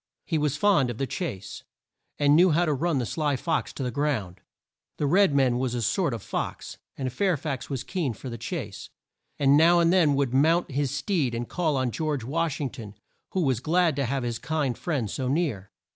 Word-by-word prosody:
He 160 -3 0
was 150 -1 0
fond 175 -11 +3
of 120 - -5
the 135 - -1
chase, 115 - -5 0.6
and 145 0 +4
knew 180 +3 +6
how 170 +2 +3
to 155 - +1
run 160 +2 0
the 125 - 0
sly 150 +2 -1
fox - - -1
to 135 - -5
the 125 - -2
ground. 120 -11 -2 0.6
The 150 - -1
red 180 +1 +4
man 130 -3 +3
was 125 -2 -1
a 120 - -2
sort 125 - +1
of 110 - -8
fox, - - -5 0.2
and 130 -2 -3
Fair 185 +3 +1
fax 140 -3 -4
was 135 -4 -3
keen 165 -10 -2
for 110 - -10
the 115 -2 -6
chase, 115 - -5 0.5
and 140 0 +4
now 170 +3 +6
and 170 +1 +4
then 160 -6 +4
would 135 -3 0
mount 160 +5 +3
his 140 0 0
steed 145 - -1
and 120 0 -3
call 160 -5 0
on 130 -2 0
George 150 -2 -2
Wash 160 +4 -1
ing 140 -4 -2
ton, 110 -6 -9 0.4
who 190 - +1
was 130 -7 +1
glad 165 +3 +2
to 140 - +1
have 135 +1 -2
his 120 -1 -3
kind 150 -6 -1
friend 140 -8 -2
so 130 - -3
near. 130 - -1
140 Hz, 220 wpm, -26 LUFS, 125-160 Hz, 0.6 s, knew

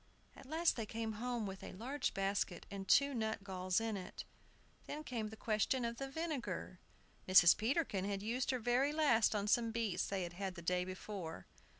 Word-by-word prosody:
At - - -13
last 325 +2 +2
they 225 -2 -3
came 225 0 -3
home 245 -3 -1
with 195 -1 -6
a - - -7
large 255 +9 -2
basket 195 -2 -1
and 195 -1 -5
two 280 0 +5
nutgalls 195 -5 -1
in 225 -1 -2
it. 185 -2 -7 0.6
Then 305 +1 -5
came 235 -7 -3
the 220 +1 -9
question 225 +4 +1
of 235 0 -3
the 270 +1 -4
vinegar. 270 - -4 0.5
Mrs. 180 -2 +8
Peterkin 225 - 0
had 200 0 -2
used 245 +4 -1
her 260 - +2
very 245 +4 +2
last 260 -9 +4
on 205 0 0
some 230 +2 +3
beets 225 -5 -1
they 190 -3 -1
had 185 +2 -5
the 170 - -8
day 180 +1 +1
before. 185 -2 -6
220 Hz, 185 wpm, -37 LUFS, 190-250 Hz, 0.6 s, Mrs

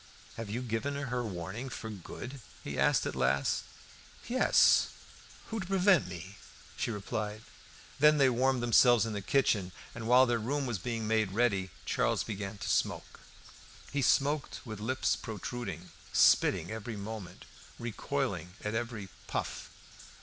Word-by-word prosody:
"Have 115 -2 -6
you 120 +5 -3
given 125 +4 -2
her 125 -3 -2
warning 105 +5 -5
for 110 -2 -6
good?" 120 - -8 0.2
he 70 - -4
asked - - +3
at - - -2
last. 65 +2 +1 0.6
"Yes. 255 +2 +5 0.6
Who 225 - -3
is - - -2
to 190 - -6
prevent 190 - +4
me?" 90 +2 -8 0.4
she - - -2
replied. 105 0 -4 0.6
Then 150 +1 +6
they 140 -2 +5
warmed 130 0 +2
themselves 120 0 +6
in 110 - -3
the 100 - -3
kitchen 100 -5 +2 0.2
while 120 +3 +5
their 120 -2 +1
room 140 +5 -1
was 120 -6 -2
being 115 +1 -3
made 110 -3 +1
ready. 100 -5 +1 0.2
Charles - - +1
began 100 -1 -5
to - - -6
smoke. - - -1 0.7
He 145 - 0
smoked 140 +2 +1
with 110 -3 -6
lips 130 +5 0
protruding, 105 -5 -6 0.2
spitting 85 - +4
every 110 0 -5
moment, 105 -2 -7 0.3
recoiling 105 -5 -3
at 105 - -2
every 115 -3 -3 0.2
puff. - - -4
115 Hz, 145 wpm, -31 LUFS, 100-130 Hz, 0.7 s, Then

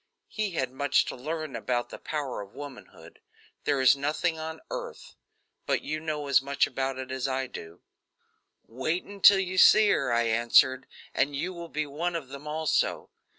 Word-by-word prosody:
He 210 -4 -3
had 130 -6 -1
much 140 +1 +2
to - - -5
learn 155 +2 -5
about 120 -1 -2
the - - -8
power 145 -7 -4
of 100 -1 -12
womanhood. 145 -3 -11 0.5
There 145 -2 +1
is 130 +1 +6
nothing 155 +4 -1
on 160 0 -6
earth - - -7 0.5
but - - 0
you 155 - -3
know 155 -2 -3
as 140 -2 +4
much 140 +1 +1
about 135 0 -3
it 130 0 -6
as 130 0 -2
I 130 0 -1
do. 85 -8 -10 0.8
"Wait 135 +9 -2
until 200 0 +6
you 185 -1 -1
see 215 -1 +7
her," - - +1
I 120 0 +3
answered, 120 +3 +3 0.3
"and 140 +2 0
you 175 +7 -3
will 170 -1 -8
be 155 0 -2
one 165 +5 -3
of 150 -6 -5
them, 140 +2 -9
also. 155 +1 -1
145 Hz, 180 wpm, -27 LUFS, 130-165 Hz, 0.8 s, see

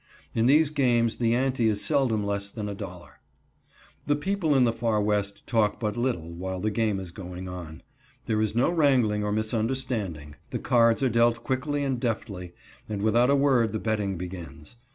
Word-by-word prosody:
In 115 +1 +2
these 150 +2 +5
games 120 -5 +2
the 115 -1 +2
ante 130 -2 +1
is 105 -2 +1
seldom 115 -7 +1
less 100 0 -2
than 105 0 -6
$1.00. 95 -4 -7 1.0
The 145 - +3
people 165 -1 0
in 130 - +5
the 115 -2 +3
Far 115 -2 0
West 105 -1 -1
talk 110 -3 +1
but 105 -2 -2
little 120 -10 -2
while 95 +2 -4
the 110 +3 -1
game 105 -2 0
is 95 -2 -7
going 90 0 -8
on. 85 -3 -8 0.4
There 110 -1 0
is 110 0 -1
no 125 +8 +3
wrangling 130 -10 +3
or 105 - -1
misunderstanding. 110 - -2
The - - -2
cards 115 +1 +3
are 130 - +3
dealt 115 0 +2
quickly 145 +3 -1
and 135 -3 -1
deftly, 100 -7 -3 0.4
and 105 -2 -3
without 120 +3 +3
a 140 - +5
word 130 -6 +3
the 110 - -1
betting 105 -4 -1
begins. 85 -1 -8
110 Hz, 180 wpm, -26 LUFS, 100-125 Hz, 1.0 s, these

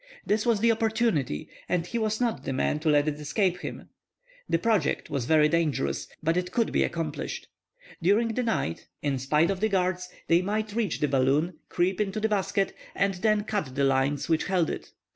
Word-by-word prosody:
This 215 +3 +1
was 225 -3 +3
the 230 0 +5
opportunity, 220 - 0 0.2
and 175 -2 +1
he 235 +6 -3
was 215 -1 0
not 240 -3 0
the 135 - -2
man 140 +3 0
to 155 0 0
let 145 0 +4
it 150 -1 -1
escape 180 +4 0
him. - - -7 0.6
The - - +3
project 215 -10 0
was 140 -4 -1
very 155 +2 +5
dangerous, 150 - 0 0.2
but 165 +1 +2
it 180 0 -1
could 230 -2 +1
be - - +2
accomplished. 160 -3 -3 0.6
During 205 +7 +3
the 225 +3 -1
night, 150 - -2 0.2
in 140 -3 0
spite 150 +7 +2
of 190 - -3
the 220 +2 +1
guards, 180 -2 0 0.2
they 170 +1 +4
might 210 +2 -2
reach 225 -3 -1
the 150 - +3
balloon, 145 +5 +1
creep 185 +3 +1
into 205 +1 -1
the 220 +1 +1
basket, 195 -1 0 0.2
and 200 0 +2
then 210 +3 +1
cut 200 -12 -3
the 140 - +1
lines 135 +1 +1
which 160 -2 +1
held 180 -4 +1
it! - - -7
180 Hz, 200 wpm, -27 LUFS, 150-215 Hz, 0.6 s, the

